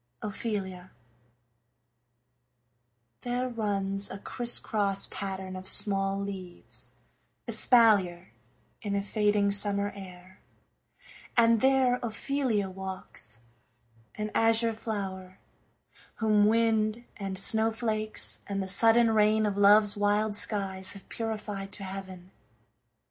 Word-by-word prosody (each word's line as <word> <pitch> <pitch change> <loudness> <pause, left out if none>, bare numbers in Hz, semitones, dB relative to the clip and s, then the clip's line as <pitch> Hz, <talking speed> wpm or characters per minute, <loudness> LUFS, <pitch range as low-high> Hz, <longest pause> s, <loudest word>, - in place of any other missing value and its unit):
OPHELIA 195 -4 -5 2.3
There 245 +1 -2
runs 200 -3 -2
a 190 - -7
crisscross 205 -3 0
pattern 190 -1 -6
of 185 0 -8
small 195 -1 +7
leaves 190 -3 -9 0.5
Espalier, 200 -8 +3 0.5
in 205 -3 -3
a 200 - -1
fading 205 -1 +1
summer 200 0 0
air, 185 -1 -13 1.0
And 230 -1 +4
there 265 -2 +2
Ophelia 240 -2 -2
walks, 185 - -9 0.7
an 210 0 -5
azure 225 0 +2
flower, 195 -4 -6 0.8
Whom 210 -2 +2
wind, 225 0 +1
and 195 -2 -5
snowflakes, 220 +1 -1
and 200 -1 -3
the 190 - -3
sudden 225 +4 +4
rain 215 0 +2
Of 205 -2 -2
love's 205 +1 +4
wild 205 +1 0
skies 195 -3 -1
have 200 - -14
purified 210 -3 -5
to 200 - -8
heaven. 190 -1 -9
205 Hz, 100 wpm, -28 LUFS, 195-220 Hz, 2.3 s, small